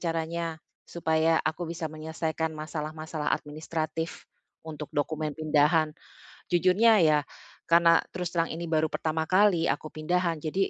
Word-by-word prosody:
caranya 165 Hz, 0 st, -2 dB, 0.3 s
supaya 160 Hz, -1 st, +1 dB
aku 160 Hz, +2 st, -2 dB
bisa 170 Hz, 0 st, -5 dB
menyelesaikan 160 Hz, +1 st, -3 dB
masalah-masalah 155 Hz, 0 st, -4 dB
administratif 155 Hz, +2 st, -3 dB, 0.4 s
untuk 155 Hz, -2 st, -7 dB
dokumen 150 Hz, +1 st, -2 dB
pindahan. 155 Hz, 0 st, +3 dB, 0.6 s
Jujurnya 185 Hz, +5 st, +4 dB
ya, 155 Hz, -2 st, +5 dB, 0.5 s
karena 170 Hz, 0 st, +6 dB, 0.2 s
terus 180 Hz, -1 st, -3 dB
terang 165 Hz, -1 st, -1 dB
ini 170 Hz, +1 st, -5 dB
baru 160 Hz, -1 st, +2 dB
pertama 160 Hz, 0 st, -2 dB
kali 185 Hz, -2 st, +4 dB
aku 155 Hz, -, -1 dB
pindahan, 170 Hz, +2 st, -1 dB
jadi 165 Hz, +6 st, -1 dB
160 Hz, 125 wpm, -28 LUFS, 155-170 Hz, 0.6 s, karena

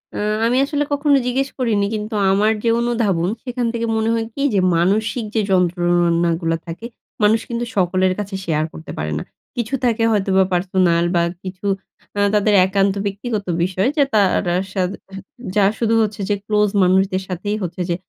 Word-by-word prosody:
আ -, -, -4 dB, 0.3 s
আমি 240 Hz, +2 st, +2 dB
আসলে 290 Hz, 0 st, -1 dB
কখনো 285 Hz, 0 st, +3 dB
জিজ্ঞেস 270 Hz, +2 st, 0 dB
করিনি। 215 Hz, -5 st, +1 dB
কিন্তু 215 Hz, +1 st, -5 dB, 0.2 s
আমার 205 Hz, +3 st, +3 dB
যে 230 Hz, -, +2 dB
অনুধাবন, 220 Hz, -8 st, 0 dB
সেখান 250 Hz, -1 st, -3 dB
থেকে 230 Hz, 0 st, -2 dB
মনে 220 Hz, 0 st, 0 dB
হয় 225 Hz, -1 st, -1 dB
কি? 275 Hz, -, -5 dB
যে, 200 Hz, -, +3 dB, 0.2 s
মানসিক 215 Hz, +7 st, +1 dB
যে 220 Hz, -, +3 dB
যন্ত্রণাগুলা 175 Hz, -2 st, +2 dB
থাকে, 170 Hz, +8 st, -7 dB, 0.4 s
মানুষ 220 Hz, +2 st, +4 dB
কিন্তু 235 Hz, 0 st, -2 dB
সকলের 185 Hz, 0 st, +2 dB
কাছে 200 Hz, -1 st, -4 dB
শেয়ার 155 Hz, -2 st, 0 dB
করতে 160 Hz, -, -9 dB
পারে 75 Hz, 0 st, -3 dB
না। -, -, -5 dB, 0.3 s
কিছু 240 Hz, +1 st, -2 dB
থাকে 230 Hz, -1 st, +1 dB
হয়তোবা 190 Hz, -2 st, +3 dB
পার্সোনাল 175 Hz, -2 st, +2 dB
বা, 170 Hz, -, +4 dB, 0.2 s
কিছু 185 Hz, +1 st, -8 dB, 0.5 s
আ -, -, +2 dB
তাদের 210 Hz, 0 st, +3 dB
একান্ত 195 Hz, +1 st, +1 dB
ব্যক্তিগত 205 Hz, +1 st, -3 dB, 0.2 s
বিষয়। 185 Hz, +4 st, 0 dB
যে 290 Hz, -, +5 dB
তার 205 Hz, -3 st, +5 dB
আর -, -, -2 dB
হা -, -, +1 dB, 0.2 s
সাথে 185 Hz, -1 st, -1 dB, 0.6 s
যার 200 Hz, -1 st, +4 dB
শুধু 230 Hz, -1 st, +1 dB
হচ্ছে 210 Hz, -1 st, -2 dB
যে 205 Hz, -, +2 dB
ক্লোজ 210 Hz, 0 st, +2 dB
মানুষদের 190 Hz, +1 st, +2 dB
সাথেই 195 Hz, +3 st, -3 dB
হচ্ছে 180 Hz, +1 st, -4 dB
যে 170 Hz, -, +1 dB
200 Hz, 175 wpm, -20 LUFS, 180-225 Hz, 0.6 s, যে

